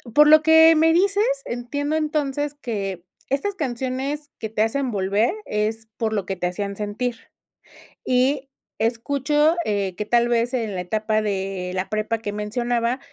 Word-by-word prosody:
por 300 0 +7
lo 310 0 +8
que 320 +1 +7
me 320 +1 +4
dices, 400 +4 +3 0.2
entiendo 285 +5 -3
entonces 295 -2 -1
que 200 -10 -4 0.3
estas 285 +10 -1
canciones 275 0 -3
que 220 - -4
te 215 0 +1
hacen 260 +4 -1
volver 205 - +1
es 220 +1 -2
por 220 -1 -1
lo 200 -3 -1
que 195 - -3
te 180 -1 -1
hacían 200 +2 -4
sentir. 215 +4 -3 0.9
Y 260 +2 +1 0.3
escucho, 280 +7 +2
eh, 200 -3 -1
que, 210 - -4
tal 235 +2 +3
vez, 240 +1 +1
en 225 -5 -2
la 180 - -2
etapa 215 +4 0
de 195 -3 -3
la 185 - -2
prepa 215 +1 -1
que 205 -2 -5
mencionaba, 235 +4 -1
235 Hz, 160 wpm, -23 LUFS, 210-285 Hz, 0.9 s, lo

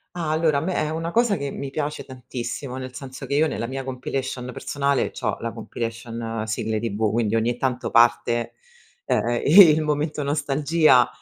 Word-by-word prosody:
Ah, 165 -3 -2
allora, 155 -2 +2
a - - 0
me 180 +4 -2
è 155 - 0
una 165 +2 -3
cosa 230 -1 +2
che 140 -2 -4
mi 140 - -5
piace 150 +2 -3
tantissimo, 130 0 -6
nel 130 -1 -7
senso 135 0 -8
che 140 - -1
io 155 +2 +4
nella 115 - -3
mia 135 +2 -4
compilation 130 -1 -4
personale 140 +2 -1
c'ho - - -3
la - - -3
compilation 115 -1 -5
sigle 110 0 -2
TV, 110 -1 -1
quindi 115 -1 0
ogni 115 +2 +1
tanto 130 -1 -2
parte, 120 0 +3 0.5
ehm, 120 0 0
il 160 -1 +8
momento 150 0 -1
nostalgia 145 -1 +3
135 Hz, 170 wpm, -23 LUFS, 120-150 Hz, 0.5 s, il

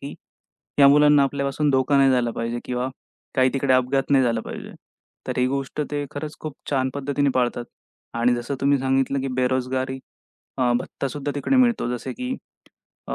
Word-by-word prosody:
की 140 - -7 0.7
या 140 - +9
मुलांना 145 0 +6
आपल्यापासून 140 +1 0
धोका 135 +1 +2
नाही 135 -1 +5
झाला 125 -2 +2
पाहिजे 115 +1 -3
किंवा 125 +1 -2 0.5
काही 130 -1 +4
तिकडे 135 -1 +1
अपघात 135 +2 +1
नाही 135 -2 +5
झाला 115 -2 +1
पाहिजे. - - -8 0.6
तर - - -2
ही 125 - +3
गोष्ट 135 +2 -3
ते 145 -1 -2
खरंच 150 +1 -6
खूप 155 -3 -6 0.2
छान 130 -2 +1
पद्धतीने 140 0 0
पाळतात 120 -1 0 0.5
आणि 120 +1 +3
जसं 120 +3 -3
तुम्ही 140 +1 +3
सांगितलं 135 +1 +1
की 135 - -3
बेरोजगारी 130 +1 -1 0.6
अ, 125 -2 +3
भत्तासुद्धा 140 +3 -4
तिकडे 265 - +1
मिळतो. 240 - +3
जसे 125 +1 -4
की 255 +1 -4 0.7
अ, - - -2
135 Hz, 170 wpm, -23 LUFS, 130-145 Hz, 0.7 s, या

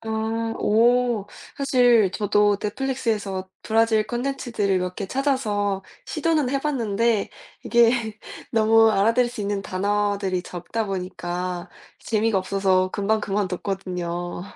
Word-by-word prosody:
아 225 0 -2
오. 235 -1 +2 0.3
사실 245 -7 +4
저도 205 -1 +2
넷플릭스에서 210 -5 -2
브라질 220 -1 +2
컨텐츠들을 240 -6 -1
몇 180 0 -3
개 200 - -4
찾아서 210 -7 0 0.2
시도는 305 -4 0
해봤는데 235 -6 0 0.3
이게 235 -2 +2 0.3
너무 225 0 +5
알아들을 225 +4 +3
수 245 -2 -7
있는 200 -1 -2
단어들이 200 -1 -1
적다 180 +7 -4
보니까 180 -1 -4 0.3
재미가 220 -2 +1
없어서 185 -1 +1
금방 210 +3 0
그만뒀거든요. 180 -3 -3
210 Hz, 270 characters per minute, -23 LUFS, 195-230 Hz, 0.3 s, 너무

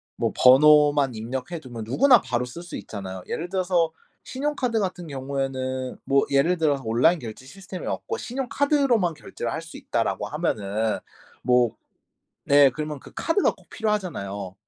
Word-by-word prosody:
뭐 - - -1
번호만 145 0 +6
입력해 130 +9 -5
두면 120 -5 -8
누구나 240 - +5
바로 120 +1 -1
쓸 170 +8 -9
수 175 - -7
있잖아요. 95 -3 -7
예를 175 +2 -4
들어서 180 -3 +1 0.3
신용카드 260 -4 -1
같은 180 -3 -3
경우에는 130 -2 -3
뭐 140 0 +3
예를 140 +6 +3
들어서 145 -4 +1
온라인 125 +10 +3
결제 120 +1 -9
시스템이 185 +5 -8
없고 455 - -3
신용카드로만 260 - +1
결제를 120 -4 -6
할 160 - -3
수 165 0 -12
있다라고 115 -1 -2
하면은 110 - -1 0.4
뭐 125 -2 +3 0.7
네. 140 -1 +6
그러면 150 +1 -5
그 - - -14
카드가 335 +5 +1
꼭 - - -23
필요하잖아요. 145 - -3
145 Hz, 350 characters per minute, -24 LUFS, 125-180 Hz, 0.7 s, 번호만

